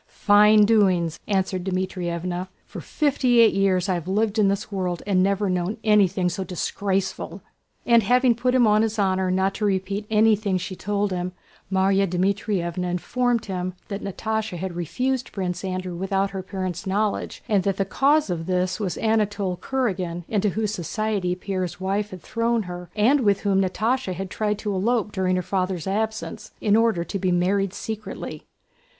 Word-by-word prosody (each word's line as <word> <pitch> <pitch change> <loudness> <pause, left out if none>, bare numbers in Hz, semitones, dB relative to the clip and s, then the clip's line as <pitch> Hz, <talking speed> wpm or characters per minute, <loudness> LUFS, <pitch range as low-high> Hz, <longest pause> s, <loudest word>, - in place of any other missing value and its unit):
"Fine 210 0 +5
doings!" 185 -7 +2
answered 190 -2 0
Dmítrievna. 180 -1 -2 0.2
"For - - -8
fifty 265 -5 +2
eight 230 -1 +6
years 190 -2 +2
have 180 -3 -2
I - - -1
lived 215 +1 +1
in 205 - +5
this 200 +2 -1
world 185 -3 -2
and 195 -2 +2
never 200 +2 +1
known 180 +2 -1
anything 200 -4 +3
so 180 +2 -2
disgraceful!" 190 0 -3 0.4
And 235 -1 +5
having 250 +3 +4
put 250 +2 0
him 250 -2 +5
on 210 0 +4
his 220 0 -1
honor 190 -2 +1
not 190 +1 +1
to 210 - -1
repeat 200 +1 -1
anything 215 -3 +3
she 185 +1 -5
told 205 +1 -1
him, 180 0 -3 0.4
Márya 195 +1 +3
Dmítrievna 180 -1 -1
informed 240 +6 0
him 185 -2 -3
that 200 0 -4
Natásha 215 0 -3
had 180 0 -4
refused 250 - -2
Prince 185 -2 -3
Andrew 185 -1 -3
without 195 +2 -1
her 190 -1 -4
parents' 185 -2 -5
knowledge 205 +2 -1
and 205 -5 +3
that 195 0 -1
the 195 - +1
cause 280 +4 +2
of 165 -1 -3
this 185 +1 0
was 195 -5 -2
Anatole 210 -4 0
Kurágin 185 -10 -2
into 210 -1 +1
whose 210 +2 -1
society 195 0 -1
Pierre's 185 -2 -4
wife 200 +2 -1
had 185 -3 -10
thrown 230 0 0
her 180 -1 -8
and 240 +7 +4
with 205 -5 +2
whom 195 -2 +2
Natásha 215 +3 0
had 190 +1 -5
tried 210 -1 -1
to 210 -1 -3
elope 210 +2 0
during 185 -2 0
her 180 - -1
father's 185 -2 -2
absence, 220 +3 -3
in 210 -1 +3
order 225 -6 +2
to 195 - -4
be 185 -1 +1
married 190 +2 +1
secretly. 215 0 -6
195 Hz, 170 wpm, -24 LUFS, 185-215 Hz, 0.4 s, eight